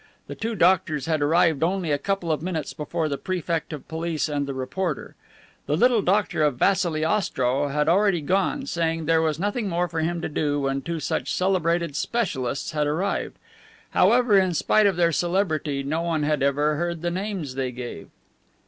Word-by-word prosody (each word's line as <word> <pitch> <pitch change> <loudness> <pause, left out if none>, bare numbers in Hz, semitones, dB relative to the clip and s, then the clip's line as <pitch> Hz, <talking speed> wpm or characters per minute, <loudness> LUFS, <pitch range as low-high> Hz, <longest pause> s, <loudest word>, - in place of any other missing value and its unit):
The - - -7
two 225 0 -3
doctors 165 -7 +2
had 155 -2 0
arrived 160 0 +3
only 175 -1 0
a 145 - +1
couple 195 -3 -1
of 155 - -1
minutes 165 -3 -3
before 160 +1 -2
the 140 -2 -3
Prefect 170 -3 -2
of 150 -3 -7
Police 165 -1 -2
and 145 -2 -2
the 140 - -3
reporter. 150 +5 -3 0.5
The 150 - +1
little 240 +1 +4
doctor 195 -3 +1
of 150 -4 +2
Vassili 175 -3 +2
Ostrow 140 -8 +1
had 150 +2 0
already 190 0 +3
gone, 195 - 0
saying 165 - -1
there 165 +1 +3
was 155 -2 0
nothing 205 +4 -1
more 175 0 0
for 160 -1 -4
him 170 +2 -1
to - - -2
do 145 -1 -1
when 135 0 -1
two 165 +3 -4
such - - -2
celebrated 170 -4 0
specialists 145 - -2
had 150 -2 0
arrived. 175 +7 -2 0.5
However, 235 -5 +4
in 185 -2 +1
spite 215 +5 +3
of 195 - +1
their 170 -1 +3
celebrity, 160 -5 0
no 155 +4 -1
one 165 -3 -1
had 150 -1 0
ever 145 +2 +2
heard 170 0 -3
the 175 - 0
names 185 -6 -4
they 130 -1 -2
gave. 125 0 -7
165 Hz, 185 wpm, -24 LUFS, 150-185 Hz, 0.5 s, little